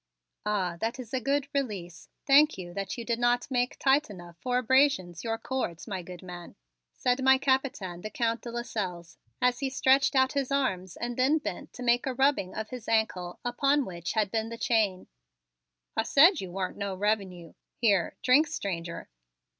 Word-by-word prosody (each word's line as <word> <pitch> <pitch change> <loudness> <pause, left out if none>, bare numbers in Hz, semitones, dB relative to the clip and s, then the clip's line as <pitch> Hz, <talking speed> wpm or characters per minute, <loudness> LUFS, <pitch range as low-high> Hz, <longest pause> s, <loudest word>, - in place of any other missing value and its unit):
"Ah, 185 -5 0
that 225 +7 -2
is 240 -2 -9
a 260 - +1
good 275 +3 0
release! 200 -11 -4 0.2
Thank 295 +2 +5
you 175 -2 -8
that 195 +3 -4
you 235 - -5
did 235 0 -1
not 240 +2 +1
make 250 0 0
tight 275 0 +3
enough 175 -4 -11
for 250 +3 0
abrasions 250 - +2
your 225 -1 -1
cords, 230 -10 -4
my 190 -4 -3
good 180 0 -10
man," 175 -1 -9 0.4
said 250 - 0
my 265 0 +6
Capitaine, 260 -10 -1
the 215 - -5
Count 230 +1 -1
de 240 - -7
Lasselles, 190 -8 -5 0.2
as 250 0 +3
he 275 -2 -1
stretched 265 +1 +3
out 260 0 +4
his 275 -2 -1
arms 190 -11 -1
and 240 0 -4
then 265 +5 +3
bent 295 -1 -6
to 250 - -8
make 240 +2 +2
a 260 - -2
rubbing 270 -8 +1
of 220 0 -4
his 250 -3 -8
ankle 190 -6 0
upon 275 +3 +2
which 175 -1 -5
had 215 -3 +1
been 225 0 -1
the 230 - -7
chain. 215 -6 +1 0.9
"I - - +2
said 315 - +5
you 190 - -6
warn't 185 +1 -4
no 200 -1 -3
revenue. 190 -4 -2 0.2
Here, 200 -7 +2
drink, 285 +5 +5
stranger!" 175 - -5
230 Hz, 185 wpm, -28 LUFS, 185-260 Hz, 0.9 s, my